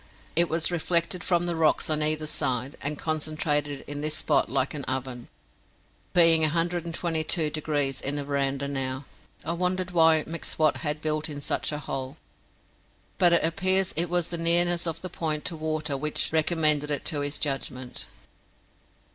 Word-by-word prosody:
It 170 +1 +4
was 165 +2 +1
reflected 170 +1 -1
from 175 -1 +1
the 175 -1 -1
rocks 160 -1 +2
on 155 -1 0
either 155 0 +1
side, 130 -2 -1
and 145 +1 -1
concentrated 150 -2 -1
in 145 0 -5
this 155 0 -2
spot 145 -6 +1
like 135 +2 0
an 145 -2 -4
oven, 130 -2 -4 0.8
being 165 -2 +5
122 165 0 0
degrees 145 -3 -1
in 140 +2 -2
the 145 -1 -3
veranda 140 -1 -1
now. 135 -1 -3 0.4
I - - -1
wondered 180 +1 -1
why 160 -2 +5
M'Swat 160 -2 0
had 150 -1 -2
built 155 0 -1
in 145 -1 -5
such 145 - -2
a 150 - -3
hole, 135 -1 -5 1.0
but 175 -2 +6
it 170 - +4
appears 185 +3 +2
it 170 +1 0
was 175 -1 0
the 170 - -3
nearness 170 +1 +3
of 165 0 -3
the 185 - -4
point 155 -4 -3
to 170 - 0
water 155 -2 -2
which 150 +2 -1
recommended 155 -2 +3
it 145 - -1
to 150 - 0
his 145 +1 -1
judgment. 130 -3 -4
155 Hz, 165 wpm, -26 LUFS, 145-170 Hz, 1.0 s, but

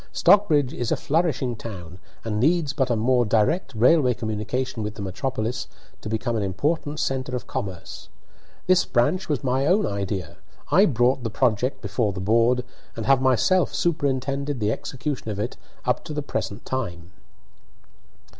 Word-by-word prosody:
Stockbridge 155 -10 +4
is 120 -2 -3
a - - +4
flourishing 145 -6 0
town, 90 -6 -8 0.3
and 105 -2 -1
needs 155 +2 +2
but 135 -3 0
a 120 - +2
more 120 +3 +3
direct 115 - +1
railway 125 +2 +4
communication 110 +2 -3
with 105 0 -4
the 105 - -7
metropolis 115 +4 -3 0.3
to 110 - -6
become 115 +2 -1
an 110 - 0
important 145 - -1
centre 130 -1 -1
of 125 - -4
commerce. 95 -3 -6 0.6
This 185 -1 +4
branch 145 +11 +1
was 145 -3 -1
my 130 +2 +1
own 195 +4 +3
idea. 95 -4 -3 0.3
I 195 +4 +6
brought 125 - +2
the 115 - -2
project 125 +2 0
before 110 -5 0
the 95 - -6
board, 115 +5 +2 0.3
and 115 - -4
have 135 -1 +4
myself 135 +8 +3
superintended 140 -3 -1
the 105 -1 +1
execution 135 0 -4
of 105 - -3
it 105 +4 -3 0.3
up - - 0
to 150 - -6
the 150 - -2
present 110 -5 -4
time." 90 -10 -4
125 Hz, 160 wpm, -24 LUFS, 110-140 Hz, 0.6 s, I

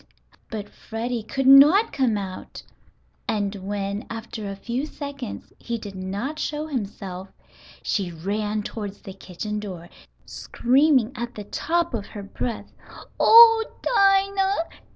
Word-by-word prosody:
But 210 -2 -5
Freddie 230 +3 -5
could 270 +5 -3
not 290 +10 +7
come 255 -6 +1
out, 190 -2 -7 0.6
and 205 -2 -1
when, 200 +1 -4
after 225 -2 -6
a 195 - -5
few 240 +8 -3
seconds 280 -6 -7
he 235 -1 -4
did 205 -3 -8
not 200 +11 -4
show 300 +1 -2
himself, 195 -8 -5 0.6
she 190 -4 -1
ran 205 +5 -2
toward 205 -2 -5
the 195 -2 -11
kitchen 205 +3 -5
door, 180 -5 -8 0.4
screaming 260 -1 +2
at 240 0 -5
the 210 - -6
top 340 +9 -1
of 210 -4 -3
her 205 - -8
breath. 225 +4 -5 0.5
"Oh, 455 0 +8 0.2
Dinah! 390 -4 +2
225 Hz, 130 wpm, -24 LUFS, 200-285 Hz, 0.6 s, Oh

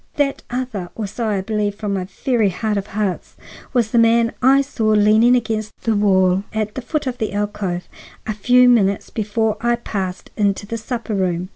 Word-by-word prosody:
That 280 -2 0
other, 240 -8 -4
or 220 - -3
so 225 +3 -4
I 205 -3 0
believe 210 0 -1
from 205 -1 -3
my 190 -2 -2 0.2
very 235 -6 +3
heart 210 +4 -2
of 200 0 -3
hearts, 205 -3 -3 0.4
was 235 -4 +1
the 235 - +3
man 230 0 +4
I 270 +2 +5
saw 260 -5 -2
leaning 215 +3 +5
against 220 -3 -2
the 225 -2 +1
wall 190 -2 +3
at 215 -1 -2
the 260 - -5
foot 300 +5 -2
of 255 -1 -4
the 215 -3 -2
alcove 205 -3 -3 0.4
a 215 - -2
few 250 +4 +4
minutes 200 -5 +2
before 220 0 -1
I 240 +1 +2
passed 195 -6 -5
into 205 -1 0
the 230 +2 -4
supper 230 0 -4
room." 185 -2 -1
215 Hz, 190 wpm, -20 LUFS, 200-235 Hz, 0.4 s, I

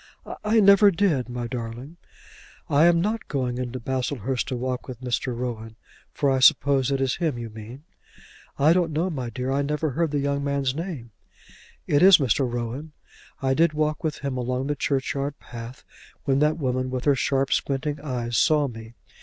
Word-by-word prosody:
"I 220 +2 +3
never 200 +1 +7
did, 165 -10 +1
my 120 0 -4
darling." 120 +5 -6 0.7
"I 145 +3 +4
am 170 -1 +4
not 215 +4 -2
going 125 -3 -2
into 125 0 -4
Baslehurst 130 0 -2
to 130 - -3
walk 125 +1 -3
with 130 -2 -8
Mr. 125 0 -2
Rowan; 115 -3 -5 0.4
for 140 -2 +1
I 135 - +2
suppose 135 0 +4
it 135 -1 0
is 135 -1 0
him 160 -7 -1
you 115 -2 -6
mean." 110 +6 -10 0.7
"I 150 +4 +5
don't 170 -3 +1
know, 170 +5 0
my 130 -6 -4
dear; 125 +2 -3
I 140 +1 +1
never 150 +1 -1
heard 165 +4 0
the 145 - -1
young 140 0 -1
man's 140 -2 0
name." 155 -7 -6 0.7
"It 145 - +2
is 190 0 +9
Mr. 130 -2 +1
Rowan. 120 +6 -5 0.5
I 135 0 +2
did 165 +3 +3
walk 155 +2 -1
with 155 -2 -2
him 135 -2 -2
along 125 +1 -2
the 145 +1 -1
churchyard 140 +1 -2
path 120 +2 -10 0.4
when 135 -2 +1
that 150 +2 +2
woman 130 -3 -1
with 130 0 -4
her 145 - +5
sharp 135 0 0
squinting 145 +2 -1
eyes 120 -5 -3
saw 150 -3 +3
me. 115 -1 -10
135 Hz, 185 wpm, -24 LUFS, 125-150 Hz, 0.7 s, is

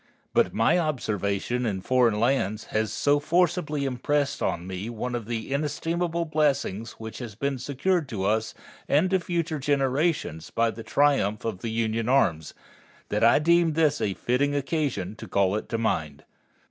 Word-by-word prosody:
But - - +3
my 115 +10 +3
observation 120 - -1
in 100 -5 -2
foreign 120 -2 +2
lands 110 -4 +1
has 110 0 0
so 145 0 +2
forcibly 155 -2 +1
impressed 140 +2 -1
on 85 - -1
me 95 +4 -5
one 120 +2 -4
of 120 -3 -4
the 115 +3 -3
inestimable 165 +4 -1
blessings 140 -9 0
which 110 0 -8
has 120 -5 -7
been 140 +3 -2
secured 145 +5 0
to 105 -6 -3
us 110 +2 0 0.3
and 160 +6 +3
to 190 - +3
future 170 -3 -2
generations 135 - 0
by 115 0 +1
the 110 +2 -9
triumph 115 -5 +1
of 110 -5 -3
the 115 - -4
Union 115 +1 -1
arms, 80 - +2 0.5
that 105 +2 0
I 115 - +6
deem 170 +1 +3
this 150 -2 +2
a 100 -3 0
fitting 140 +4 0
occasion 135 - -2
to 110 - -9
call 100 0 +2
it 110 - -4
to 115 - -1
mind. 80 -10 -2
125 Hz, 165 wpm, -26 LUFS, 110-150 Hz, 0.5 s, I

